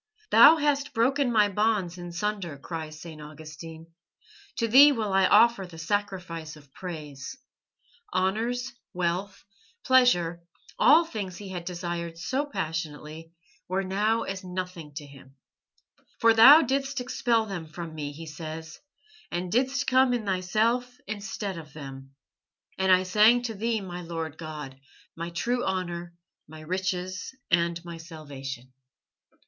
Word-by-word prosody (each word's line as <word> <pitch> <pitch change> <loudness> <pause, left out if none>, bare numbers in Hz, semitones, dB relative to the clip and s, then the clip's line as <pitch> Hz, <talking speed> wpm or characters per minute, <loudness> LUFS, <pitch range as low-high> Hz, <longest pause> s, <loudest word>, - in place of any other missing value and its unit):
"Thou 235 +8 +9
hast 290 -3 0
broken 260 +3 +2
my 210 -3 +5
bonds 205 -3 0
in 175 0 -7
sunder," 180 -4 -3
cries 155 +1 -7
St. 160 -2 -10
Augustine, 155 +2 -10 0.7
"to 230 - 0
Thee 275 +6 +8
will 220 -7 -1
I 190 -1 +5
offer 220 -2 +5
the 165 -2 -12
sacrifice 175 -3 -3
of 145 -3 -18
praise." 155 - -7 0.7
Honours, 235 +7 -1 0.2
wealth, 180 +3 -2 0.4
pleasure, 175 -11 +4 0.4
all 320 +5 +6
the 330 - -16
things 190 -5 -5
he 200 -2 -8
had 175 -2 -6
desired 170 -2 -4
so 265 - -2
passionately, 160 - -5 0.4
were 190 +2 -1
now 210 +4 +1
as 195 0 -5
nothing 180 -4 -6
to 150 -1 -6
him. 135 -1 -16 0.8
"For 230 0 +5
Thou 270 +8 +9
didst 275 +1 -1
expel 240 -2 +1
them 180 -6 -6
from 165 +1 -7
me," 150 -2 -5
he 160 +3 -9
says, 160 +1 -8 0.5
"and 175 0 -3
didst 260 +3 +1
come 260 -1 +4
in 230 -3 -4
Thyself 220 +7 0
instead 205 -2 -5
of 155 -3 -13
them. 135 -2 -10 0.6
And 190 0 +2
I 185 0 +6
sang 215 +6 +5
to 235 -2 -3
Thee, 220 +1 -1
my 180 -2 -6
Lord 165 -2 -5
God, 150 -4 -7 0.4
my 170 +1 -5
true 240 +9 -1
honour, 175 -2 -3 0.3
my 155 +1 -11
riches, 185 +5 -3 0.2
and 170 0 +2
my 170 -1 -7
salvation." 135 -6 -8
185 Hz, 140 wpm, -27 LUFS, 160-225 Hz, 0.8 s, Thou